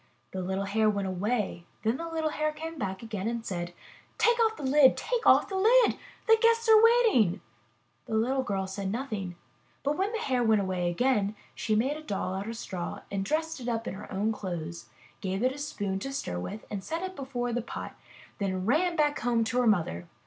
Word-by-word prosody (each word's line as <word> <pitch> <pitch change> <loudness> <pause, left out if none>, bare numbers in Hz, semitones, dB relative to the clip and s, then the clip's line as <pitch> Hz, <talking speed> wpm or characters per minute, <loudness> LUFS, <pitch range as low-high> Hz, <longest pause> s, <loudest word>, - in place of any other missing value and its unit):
The 190 - -3
little 190 +2 -2
Hare 215 +2 +2
went 200 -2 -1
away; 190 -1 -2 0.2
then 225 +3 +1
the 335 0 -5
little 320 -1 -1
Hare 305 0 0
came 320 +1 -7
back 190 +1 -3
again 215 -3 -4
and 230 0 -3
said: 175 -2 -3 0.5
'*Take 475 0 +3
off 445 -1 +3
the - - -7
lid! 270 0 +5
Take 485 -2 -1
off - - +6
the 390 - -5
lid! 465 +5 +5 0.3
The 450 0 +6
guests 460 0 +4
are 440 0 +8
waiting!'' 460 - +5 0.7
The 220 - -2
little 255 +5 +2
girl 195 -6 -2
said 190 0 -4
nothing, 215 -7 -4 0.5
but 285 +2 +1
when 390 +5 0
the 460 - -2
Hare 260 - 0
went 220 -2 +4
away 185 -2 0
again, 210 +1 +1 0.2
she 215 - -1
made 265 +7 +1
a - - -8
doll 195 -9 -3
out 195 +3 -4
of 230 - -5
straw, 180 -6 -5 0.2
dressed 320 +8 -1
it 245 -1 -4
up 230 0 -2
in - - -3
her 200 +2 -9
own 205 +3 0
clothes, 170 -5 -5 0.3
gave 190 +1 -2
it 255 - +3
a 280 - -8
spoon 200 -9 -3
to 270 +7 -4
stir 90 - -3
with, 205 - -6
set 325 - -4
it 375 0 -5
before 245 -4 -3
the 245 - 0
pot, 230 - -7 0.4
and 190 -2 -1
ran 335 - +2
back 300 -1 +2
home 235 -1 +2
to 245 +3 0
her 245 - +3
mother! 160 - +1
230 Hz, 210 wpm, -29 LUFS, 195-305 Hz, 0.7 s, are